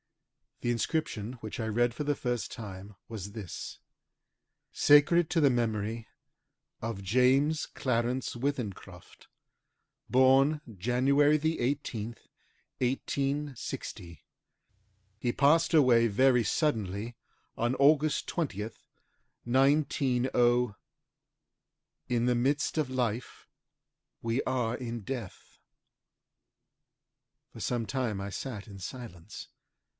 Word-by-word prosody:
The 120 - 0
inscription 120 -2 -2
which 110 +2 -6
I 110 - -1
read 120 +2 +1
for 150 - -4
the 145 0 0
first 120 -3 -2
time 100 -2 -8
was 100 -3 -7
this 105 -6 -7 0.9
SACRED 155 +4 +5
TO 165 - +2
THE 140 - +6
MEMORY 115 -2 -1 0.7
OF 115 -3 -4
JAMES 130 +8 +3
CLARENCE 125 0 -1
WITHENCROFT. 115 -9 -5 0.8
BORN 135 +4 +4 0.2
JAN. 125 +7 0
18TH, 145 -5 +1 0.6
1860. 135 - -3 1.0
HE 120 +1 0
PASSED 160 +5 +3
AWAY 120 -6 +5
VERY 125 +3 +4
SUDDENLY 110 - -1 0.4
ON 120 +2 0
AUGUST 150 +1 +3
20TH, 110 - -3 0.7
190 125 -3 +2 1.3
"In 120 -1 +1
the 125 0 +2
midst 140 +6 0
of 150 -4 0
life 120 -2 -3 0.7
we 115 +3 -1
are 120 -3 0
in 120 -2 -5
death." 115 -3 -7 1.9
For - - -11
some 120 -2 -1
time 120 -5 -2
I 100 - -4
sat 110 -2 -6
in 100 -2 -10
silence. 100 -3 -8
125 Hz, 95 wpm, -30 LUFS, 110-140 Hz, 1.9 s, THE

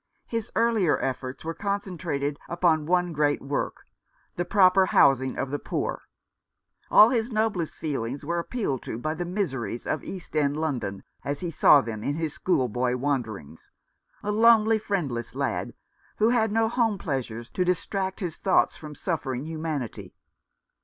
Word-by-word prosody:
His 230 -2 -4
earlier 225 -8 +3
efforts 130 +2 -4
were 165 - -2
concentrated 175 -8 -3
upon 165 -3 +2
one 180 -1 +2
great 145 -1 +2
work, 140 +1 -3 0.5
the 175 - -1
proper 190 0 +5
housing 130 -5 +4
of 135 - -2
the 145 - -2
poor. - - -3 0.9
All 215 - +8
his 235 -1 0
noblest 215 -7 0
feelings 140 -3 -3
were 170 +2 -1
appealed 170 - -2
to - - -5
by 155 +6 -2
the 175 +2 -4
miseries 145 - -3
of 155 - -2
East 185 -4 -8
End 145 -1 +2
London, 120 -11 -2 0.2
as 140 0 -3
he 175 -2 -3
saw 145 -2 +6
them 110 -4 -6
in 145 - -1
his 160 -2 -2
school 135 -9 +1
boy 125 +2 0
wanderings, 115 - -3 0.5
a 210 - -1
lonely, 220 0 +5
friendless 145 - -3
lad, - - -2 0.4
who 220 +2 +4
had 225 -3 +2
no 225 +1 +2
home 225 -3 +1
pleasures 125 - -4
to 180 - 0
distract 190 +2 -1
his 170 -3 -3
thoughts 195 - +2
from 150 -1 -9
suffering 140 -7 -3
humanity. 155 -6 -5
160 Hz, 155 wpm, -26 LUFS, 135-195 Hz, 0.9 s, All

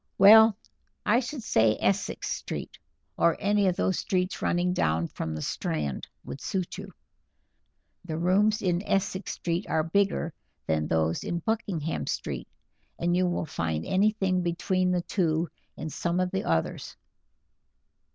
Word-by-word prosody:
Well, 220 +2 +8 0.5
I 230 +3 +4
should 260 0 -5
say 110 - +3
Essex 195 +1 0
Street, - - -5 0.4
or 170 - +3
any 205 0 +2
of 180 - +2
those 190 - 0
streets 185 0 -1
running 180 +1 +1
down 80 - +1
from 80 -1 -5
the 75 - -4
Strand, 75 -4 -3 0.2
would 135 - -7
suit 185 -1 -3
you. 195 -1 -8 1.1
The 160 -3 -4
rooms 200 +6 +2
in 175 -2 +1
Essex 195 -1 -1
Street 175 +3 -2
are 160 -1 +2
bigger 170 -1 +1 0.3
than 80 -1 0
those 80 0 0
in 170 - -2
Buckingham 170 -5 -2
Street, - - -3 0.5
and 175 +1 +1
you 180 0 +2
will 175 -2 -1
find 80 - -2
anything 195 -2 +2
between 180 +2 0
the 180 -1 +1
two 165 -3 0 0.3
in 155 - -5
some 170 +3 -1
of 185 0 0
the 190 - -2
others. 80 -1 -1
180 Hz, 145 wpm, -27 LUFS, 155-195 Hz, 1.1 s, Well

